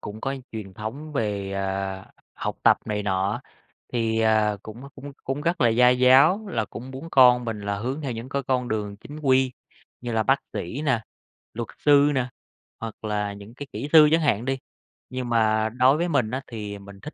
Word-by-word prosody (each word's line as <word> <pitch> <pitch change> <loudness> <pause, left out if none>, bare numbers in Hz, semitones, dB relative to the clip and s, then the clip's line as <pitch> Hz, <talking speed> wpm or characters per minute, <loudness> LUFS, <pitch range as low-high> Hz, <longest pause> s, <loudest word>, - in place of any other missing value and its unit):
cũng 105 +1 -8
có 135 +3 -2 0.2
truyền 105 -4 -7
thống 130 +9 -6
về, 105 -7 -2
ờ, 95 0 -3 0.3
học - - -4
tập - - +6
này 105 -1 -2
nọ 100 +3 0 0.5
thì, 115 -2 0
ờ, 110 -1 +3
cũng 110 +3 -9
cũng 140 +1 -9
cũng 135 +2 -3
rất 170 +2 0
là 120 - +5
gia 125 +2 +5
giáo 130 +12 +5
là 115 - -1
cũng 125 +4 -9
muốn 135 +5 -8
con 125 -2 +6
mình 110 -3 -4
là 100 0 -2
hướng 130 +7 -3
theo 140 -4 -3
những 115 +2 -6
cái 140 0 -1
con 125 -2 +1
đường 105 -2 -3
chính 145 +8 -10
quy 130 -3 +3 0.5
như 120 -1 -4
là 110 -1 +1
bác 135 +4 +2
sĩ 120 - -4
nè, 130 -7 +1 0.5
luật 115 0 -4
sư 145 0 +5
nè, 130 -2 0 0.5
hoặc 115 -1 -7
là 105 -1 -1
những 100 +2 -12
cái 145 +1 -8
kỹ 145 - -4
sư 155 -2 +9
chẳng 165 +1 +4
hạn 120 -7 +1
đi. 135 0 -1 0.5
Nhưng 130 -1 -4
mà 110 -1 +2
đối 125 +5 +4
với 175 +2 0
mình 125 -8 +1
á, 130 +1 -2
thì 105 -3 -6
mình 100 0 -13
thích 150 - -8
120 Hz, 205 wpm, -25 LUFS, 105-135 Hz, 0.5 s, sư